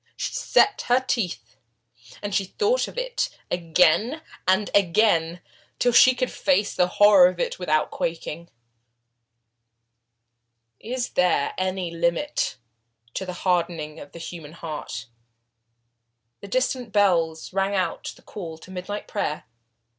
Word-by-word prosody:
She - - -3
set 415 - +3
her 245 +1 +4
teeth, 180 - -3 0.7
and 205 -1 -3
thought 420 - +1
of - - -11
it - - -1 0.2
again 180 - +2 0.2
and 190 +2 +2
again, 175 -3 +3 0.4
till 245 - +2
she 255 +2 +7
could 255 0 -1
face 270 -8 +1
the 180 - +2
horror 205 -3 +8
of 180 -1 -8
it - - -2
without 155 -4 +1
quaking. 165 0 -4 2.3
Is 245 +2 -3
there 180 -6 +1
any 185 -2 -2
limit 170 - -1 0.6
to 190 - -4
the 180 - -4
hardening 170 -4 0
of 145 - -11
the - - -11
human 165 -2 -8
heart? 160 -7 -6 1.3
The 200 - -10
distant 250 +1 -1
bells 170 -6 +1
rang 195 +1 0
out 185 -3 -2
the - - -20
call 165 -6 -8
to 185 - -14
midnight 190 +3 -5
prayer. 155 -7 -2
185 Hz, 125 wpm, -24 LUFS, 165-215 Hz, 2.3 s, horror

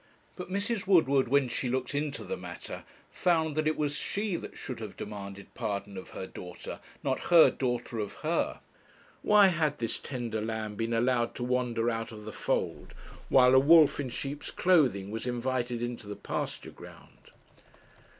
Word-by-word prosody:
But 180 -1 -7
Mrs. 200 +1 -1
Woodward, 140 -8 +4
when 140 +1 +3
she 125 +1 -2
looked 130 +1 -1
into 145 0 -2
the 475 - -3
matter, - - -8 0.3
found 160 -3 +1
that 155 0 +1
it 155 - +1
was 145 -1 0
she 205 +3 -2
that - - -7
should 125 -3 -6
have 110 -3 -7
demanded 100 -1 -8
pardon 100 -3 -3
of 95 - -8
her - - -6
daughter, 90 -1 -8 0.2
not - - -1
her 170 -2 +7
daughter 120 -2 -2
of 105 -2 -4
her! - - 0 0.6
Why 205 -2 +6
had 155 -4 0
this 115 -1 -1
tender 120 -5 -4
lamb 110 -1 -3
been 115 +2 -2
allowed 120 0 +1
to - - -4
wander 120 -2 0
out 115 0 -3
of 105 -1 -10
the 110 - -7
fold, - - -2 0.3
while 125 -1 +6
a 130 - +8
wolf 155 +2 +6
in 135 -3 -2
sheep's 140 +4 -4
clothing 130 - +2
was 110 +3 -4
invited 120 -1 -1
into 120 -3 -5
the 105 - -5
pasture - - -4
ground? - - -15
125 Hz, 170 wpm, -29 LUFS, 115-150 Hz, 0.6 s, a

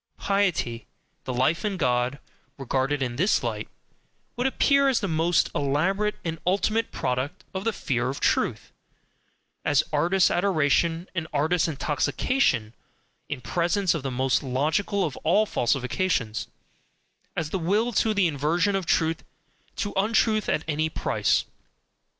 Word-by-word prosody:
Piety, 185 - 0 0.4
the - - -3
"Life 130 +7 +1
in 205 -3 -1
God," 125 -3 +1 0.4
regarded 135 +1 -1
in 120 -1 -3
this 185 +8 +2
light, - - -3 0.7
would 250 +1 0
appear 280 +1 +3
as 255 - +2
the 200 - -2
most 165 +1 +2
elaborate 190 +10 0
and 165 -1 -3
ultimate 215 +5 +1
product 130 +6 -2
of 190 +2 -4
the 225 - +2
FEAR 125 - -1
of 135 - -4
truth, - - 0 0.9
as 145 -2 +3
artist 175 +5 +3
adoration 170 -1 +1
and 170 -3 -3
artist 160 +3 +1
intoxication 145 - 0 0.6
in 145 -3 -4
presence 175 +6 +1
of 165 - -3
the 135 - -3
most 130 +1 +1
logical 155 +10 0
of 150 - -5
all 190 +7 +2
falsifications, 125 - -1 0.9
as 155 -2 -3
the 190 - -1
will 210 +8 +1
to 220 +2 +2
the 200 -2 +3
inversion 165 +6 +1
of 190 -3 -2
truth, 160 0 +1 0.5
to 205 - -3
untruth 215 +1 +2
at 155 - 0
any 155 0 0
price. - - 0
165 Hz, 140 wpm, -25 LUFS, 140-195 Hz, 0.9 s, appear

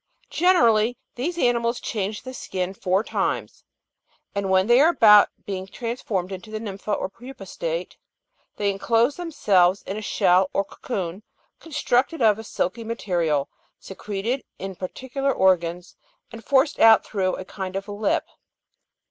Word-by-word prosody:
Generally 240 -10 +3 0.2
these 325 +8 -3
animals 240 -4 +1
change 210 -1 -4
the 255 0 -8
skin 185 -6 -4
four 190 +1 0
times; - - -3 0.7
and 200 -1 -2
when 190 0 +4
they 240 +4 +5
are 315 - +6
about 210 -10 +7 0.2
being 190 -1 -5
transformed 210 -4 -4
into 190 +2 -8
the 215 0 -5
nympha 210 -1 -6
or 205 - -1
pupa 250 +7 -11
state, - - -4 0.6
they 205 -1 0
enclose 230 +6 +1
themselves 200 - +2
in 195 - -5
a - - -4
shell 185 -2 +2
or 195 - 0
cocoon, 190 -5 -5 0.4
constructed 290 -1 0
of 220 -3 +4
a - - -7
silky 225 +1 -3
material, 175 -10 -1 0.3
secreted 210 +6 -4
in 195 0 -6
particular 260 +9 -3
organs, 180 -4 +1 0.4
and 225 -1 -10
forced 275 +5 +2
out 225 -1 +7
through 185 -3 -1
a 185 - -7
kind 190 -1 -6
of 195 +1 -4
lip. 205 0 -1
210 Hz, 145 wpm, -23 LUFS, 190-245 Hz, 0.7 s, about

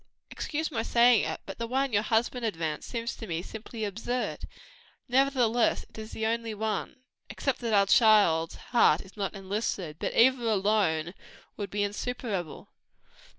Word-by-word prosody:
Excuse 315 +1 -3
my 230 -5 -1
saying 235 0 +4
it, - - -4
but 195 - -8
the 230 - -2
one 265 +1 0
your 205 - +4
husband 235 +3 0
advanced, 165 -8 -3
seems 235 -1 -3
to 225 - -8
me 170 -1 -3
simply 220 +1 -6
absurd." 230 +5 -3 0.6
"Nevertheless 250 -3 +2
it - - -21
is 220 0 -8
the 220 - -3
only 225 -1 -1
one; 220 +4 -3 0.3
except 275 - -2
that 230 -3 -2
our 200 0 +5
child's 200 -7 +4 0.2
heart 175 -9 +5
is 195 - -15
not 200 -1 -3
enlisted; 195 -5 -3
but - - -3
either 255 +1 +5
alone 195 -6 +1 0.4
would 205 -2 -5
be 205 +2 -1
insuperable." 205 - -4
220 Hz, 155 wpm, -28 LUFS, 195-240 Hz, 0.6 s, our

